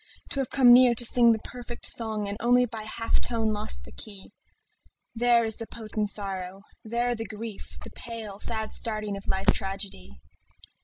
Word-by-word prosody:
To 275 - -3
have 265 - -2
come 250 -3 +6
near 245 -1 +5
to 240 - +1
sing 235 0 +6
the 225 - +1
perfect 240 +1 -7
song 220 -3 +4
And 200 - -4
only 245 +1 +3
by 225 -2 -7
a - - -9
half 230 +1 -2
tone 225 -2 -1
lost 210 +1 +2
the - - -13
key, 200 -3 -7 0.8
There 235 0 +2
is 220 -1 +1
the 230 - -5
potent 215 -2 -3
sorrow, 195 -1 -2 0.2
there 235 +2 -1
the 225 -1 -5
grief, 215 0 -9
The - - -10
pale, 220 -4 -8
sad 220 -1 +1
staring 215 -2 0
of 195 - -10
life's 190 0 +2
tragedy. 195 - -3
220 Hz, 185 wpm, -26 LUFS, 205-235 Hz, 0.8 s, come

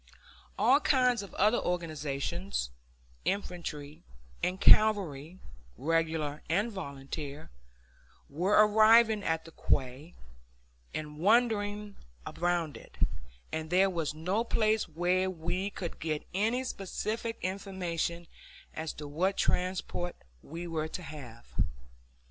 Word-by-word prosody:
All 275 +3 +5
kinds 250 -5 +3
of 200 - -9
other 215 +4 +4
organizations, 165 - -2 0.5
infantry 170 -7 -3 0.4
and 180 +1 0
cavalry, 185 -8 +5 0.4
regular 160 -1 0
and 205 +8 +1
volunteer, 140 - -6 0.8
were 180 +8 0
arriving 220 0 +6
at 160 -2 -1
the 165 - -11
quay 135 +3 -1 0.8
and 150 -1 -6
wandering 210 0 +2 0.3
around 175 -3 -1
it, - - -15 0.5
and 160 0 -3
there 190 +2 +4
was 165 -4 -2
no 185 +8 0
place 220 -2 +1
where 180 +3 +1
we 180 +3 -2
could 180 -4 -6
get 155 -2 -2
any 225 +7 +1
specific 225 +1 -3
information 180 -3 -2 0.5
as 160 0 -4
to 150 - -7
what 180 +7 0
transport 180 -1 -1 0.3
we 165 +4 -7
were 160 -2 -2
to 180 +3 -6
have. 130 -7 -10
175 Hz, 110 wpm, -31 LUFS, 155-205 Hz, 0.8 s, arriving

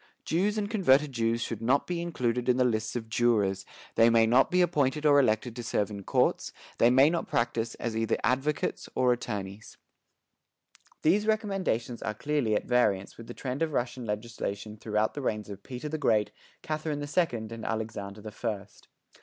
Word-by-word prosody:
Jews 200 +6 +1
and 205 -1 -1
converted 150 - +3
Jews 115 -1 0
should 115 -2 -4
not 130 +5 +2
be 175 -1 -3
included 125 -8 -1
in 125 - +4
the 130 - +4
lists 110 -2 -1
of 115 -2 -4
jurors; 105 -5 +1 0.3
they 115 +1 +5
may 115 -1 +5
not 125 +4 +4
be 180 0 +4
appointed 150 -3 0
or 145 -1 +6
elected 115 -2 +1
to 120 - -5
serve 105 -2 -1
in 100 -1 -6
courts, - - +1 0.3
they 115 - +6
may 130 +3 +6
not 170 - -2
practice 115 -1 -1
as 115 -1 -4
either 115 0 0
advocates 135 +4 0
or 125 -1 +4
attorneys." 105 -4 -6 1.3
These 200 +7 +3
recommendations 195 - -1
are 110 - -3
clearly 140 -4 0
at - - -1
variance 105 -6 +1
with 115 - -11
the - - -8
trend 130 +2 -4
of 160 -2 0
Russian 120 0 -2
legislation 105 -1 -4
throughout 105 0 -1
the 145 - -5
reigns 105 -5 -2
of 100 0 -8
Peter 125 +6 -7
the 155 +1 -3
Great, 110 -6 +2 0.3
Catherine 155 -1 -2
the 145 - -3
Second 135 -8 -1
and 115 -1 -7
Alexander 110 -2 -4
the 110 +1 -8
First. 105 -3 -6
120 Hz, 185 wpm, -28 LUFS, 110-145 Hz, 1.3 s, or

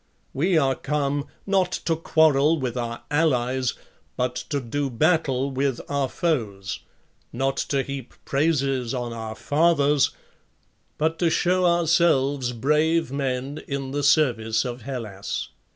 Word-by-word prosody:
We 170 +6 +2
are 135 -3 +3
come, 145 +1 -1 0.2
not 190 -2 +2
to 165 - +2
quarrel 160 -1 +3
with 130 -3 -3
our 120 -1 -4
allies, 130 -5 +1 0.4
but 125 0 0 0.2
to 145 - 0
do 140 +3 -2
battle 140 -1 +1
with 135 -1 0
our 140 -2 0
foes; 110 - -2 0.5
not 135 +3 -1
to 135 -2 0
heap 135 -2 -7
praises 135 -4 0
on 120 -2 -3
our 110 -1 -6
fathers, 145 -1 +3 0.9
but 160 +2 0
to 170 - +3
show 180 +2 +2
ourselves 160 -6 +2
brave 150 +5 +1
men 135 +1 -2
in 135 -1 -3
the 145 +1 -1
service 120 -6 +2
of 125 0 -5
Hellas. 110 -6 -5
140 Hz, 130 wpm, -24 LUFS, 125-155 Hz, 0.9 s, are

